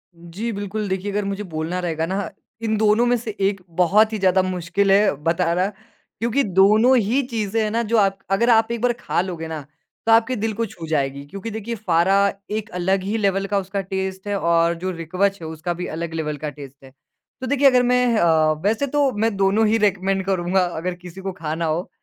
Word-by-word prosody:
जी, 170 +7 -6
बिल्कुल। 205 0 -4
देखिए, 190 +2 -2
अगर 205 0 -1
मुझे 200 +1 -3
बोलना 165 +1 -4
रहेगा 165 -2 -2
ना, 190 +3 -3 0.3
इन 220 -1 0
दोनों 215 +2 +3
में 245 - +3
से 220 -2 -6
एक 195 -1 +1
बहुत 210 +5 +4
ही 215 - -1
ज़्यादा 190 0 +3
मुश्किल 185 +2 0
है 200 +1 +5
बताना 170 +2 +1 0.5
क्योंकि 235 +5 +1
दोनों 210 +6 +4
ही 235 +6 +2
चीज़ें 225 -2 -1
हैं 215 - 0
ना 230 +1 +1
जो 230 +1 +1
आप 195 -2 +3
अगर 235 +5 +2
आप 225 0 +4
एक 235 -1 -3
बार 245 -1 +2
खा 205 - -1
लोगे 170 -3 -5
ना, 160 -2 -5 0.4
तो 225 - +3
आपके 230 +3 +4
दिल 220 +1 -2
को 230 +2 -1
छू 170 -6 -9
जाएगी 140 -2 -1
क्योंकि 195 +9 -7
देखिए, 220 +2 -4
फारा 195 0 +2 0.2
एक 220 +1 -3
अलग 190 +2 +1
ही 205 +4 -1
लेवल 195 -2 +1
का 200 - 0
उसका 195 +1 -3
टेस्ट 190 0 -4
है 205 -1 0
और 170 0 +2
जो 185 - -1
रिकवच 185 +4 -1
है, 160 - -6
उसका 160 +2 -4
भी 180 +1 -5
अलग 165 +1 -5
लेवल 150 -2 -3
का 150 +1 -4
टेस्ट 140 -2 -12
है। 130 - -14 0.5
तो 260 - -3
देखिए, 280 +1 +4
अगर 250 -2 +5
मैं 250 0 +3
अ, 160 -4 +3
वैसे 225 +8 +1
तो 285 -1 +2
मैं 220 -1 0
दोनों 195 +3 +3
ही 220 - +3
रिकमेंड 195 -2 +1
करूँगा, 185 -1 +1
अगर 175 +1 -4
किसी 180 +1 -11
को 190 0 -3
खाना 165 -2 -4
हो। 160 +3 -2
195 Hz, 215 wpm, -22 LUFS, 175-220 Hz, 0.5 s, है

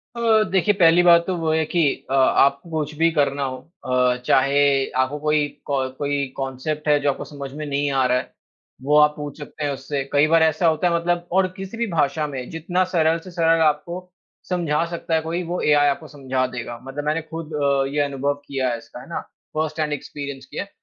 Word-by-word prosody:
अ, 225 -2 +3
देखिए 195 +2 +3
पहली 175 -3 +5
बात 170 -1 +6
तो 185 - 0
वो 160 -1 0
है 160 0 +1
कि 170 +2 0 0.3
अ, - - 0
आपको 140 +3 +3
कुछ 155 -2 -3
भी 165 +1 +4
करना 140 -2 +1
हो 130 -1 -3 0.3
अ, 125 -1 +2
चाहे 140 +3 +3 0.3
आपको 130 +3 0
कोई 150 0 +1 0.2
को 135 -2 -1
कोई 145 -1 -1
कॉन्सेप्ट 135 +3 -4
है 145 -1 +4
जो 145 0 +1
आपको - - -7
समझ 140 -2 -8
में 150 0 -5
नहीं 145 0 -1
आ 135 -1 +2
रहा 125 0 +2
है, 125 - -5 0.5
वो 150 +3 +3
आप 150 0 +5
पूछ 145 0 -7
सकते 150 +1 -7
हैं 145 - 0
उससे 140 +1 -3
कई 145 +2 +5
बार 165 0 +4
ऐसा 160 +2 +2
होता 160 +2 +2
है 170 - +1
मतलब 175 +1 -1
और 190 0 +4
किसी 195 +4 -7
भी 235 -1 -1
भाषा 150 -1 +1
में, 130 -3 -6
जितना 175 +3 -1
सरल 160 0 +3
से 180 +2 -12
सरल 165 -1 +2
आपको 160 +3 +1 0.5
समझा 165 -4 0
सकता 170 -1 -2
है 160 - +2
कोई 170 +3 -3
वो 175 +2 -3
एआई 145 -1 +4
आपको 150 +3 -1
समझा 130 -3 -2
देगा। 120 -2 -6
मतलब 135 +2 -6
मैंने 155 +2 0
खुद 160 0 -8
अ, 140 -2 +1
ये 150 - 0
अनुभव 140 0 0
किया 135 -2 -1
है 120 - -2
इसका, 125 - -12
है - - -13
ना? - - -3 0.4
फ़र्स्ट 155 0 -2
हैंड 150 -1 0
एक्सपीरियंस 140 -2 -6
किया - - -5
है। 200 - -17
150 Hz, 220 wpm, -22 LUFS, 140-165 Hz, 0.5 s, बात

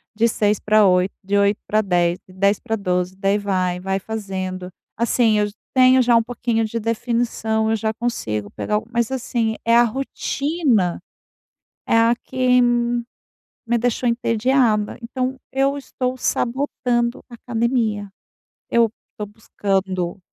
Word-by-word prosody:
de 230 +2 +3
6 210 -2 +1
para 215 0 +4
8, 180 +1 +2
de 200 +1 0
8 200 +1 +2
para 215 +1 +2
10, 175 -3 +1
de 185 - -16
10 200 +2 +2
para 225 -2 -2
12, 180 -1 -1
daí 195 +1 +1
vai, 185 -3 -1
vai 195 +1 -1
fazendo. 190 -4 -5 0.3
Assim, 230 -2 +2
eu 210 - +2
j 205 - -10 0.2
tenho 255 0 +6
já 240 -1 +4
um 230 - +4
pouquinho 235 -1 -1
de 230 +2 -3
definição, 230 -1 -1
eu - - +2
já 220 0 -1
consigo 110 - -3
pegar 210 - -2
algo 215 +2 -2
mas 235 +1 0
assim, 235 -3 -1
é 230 - +4
a 240 - +7
rotina, 270 - 0 0.9
é - - +3
a 230 +1 +4
que 250 0 +2
me 240 0 +1 0.7
deixou 245 +1 0
entediada. 230 -2 +1
Então, 255 +2 -3
eu 275 +1 +1
estou 255 -2 -3
sabotando 245 -1 -1
a 240 - -14
academia. 230 -4 -1 0.6
Eu 230 -2 +3 0.2
estou 210 - -6
buscando, 195 -3 -2
225 Hz, 150 wpm, -21 LUFS, 200-240 Hz, 0.9 s, a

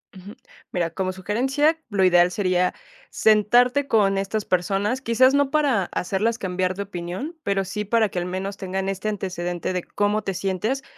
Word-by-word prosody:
Ujú. 190 +2 -11 0.4
Mira, 175 -2 -1
como 185 +2 -2
sugerencia, 265 - +1
lo 200 -3 +1
ideal 175 -1 +5
sería 180 -2 +1 0.4
sentarte 245 +6 +3
con 195 -3 +3
estas 195 +2 -2
personas. 195 +7 0
Quizás 255 +2 +4
no 285 -1 +2
para 285 -10 +2
hacerlas 210 +7 -1
cambiar 185 0 -1
de 200 - -3
opinión, 190 - -6
pero 195 -1 0
sí 210 +3 -4
para 220 0 +2
que 185 - -8
al 175 - -1
menos 190 +2 -4
tengan 190 0 -3
este 195 +2 -4
antecedente 180 -4 -3
de 180 -1 -2
cómo 205 +1 -1
te 195 - -2
sientes 195 +8 -2
195 Hz, 170 wpm, -23 LUFS, 185-225 Hz, 0.4 s, ideal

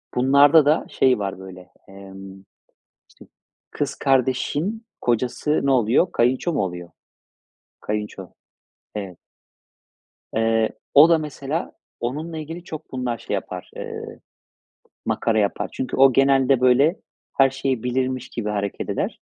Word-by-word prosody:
bunlarda 140 +4 +5
da 150 +2 +2
şey 130 -4 +2
var 95 -2 -4
böyle. 95 -1 -11 0.2
Emm, 95 0 -12 0.7
işte - - -18 0.4
kız - - -3
kardeşin 140 - 0 0.2
kocası 125 +5 0
ne 140 - +3
oluyor? 125 - +3
Kayınço 130 +8 +1
mu 145 - 0
oluyor? 90 -2 -6 0.9
Kayınço, 105 -3 -5 0.7
evet. 95 -4 -6 1.2
Eee, 115 0 +2 0.2
o 150 +4 +8
da 165 - +5
mesela 150 +1 -4 0.3
onunla 155 +7 -4
ilgili 165 +3 -7
çok 155 -3 -9
bunlar 125 -2 -2
şey - - -6
yapar, - - -5
eee, - - -7 0.9
makara 115 -1 0
yapar. 100 -2 0
Çünkü 130 - -4
o 135 -1 +6
genelde 135 -1 +3
böyle 135 +7 +3 0.4
her 135 -1 +6
şeyi 135 -3 -2
bilirmiş 130 +1 -2
gibi 110 -3 -4
hareket 100 -1 -3
eder. - - -3
130 Hz, 125 wpm, -22 LUFS, 105-140 Hz, 1.2 s, o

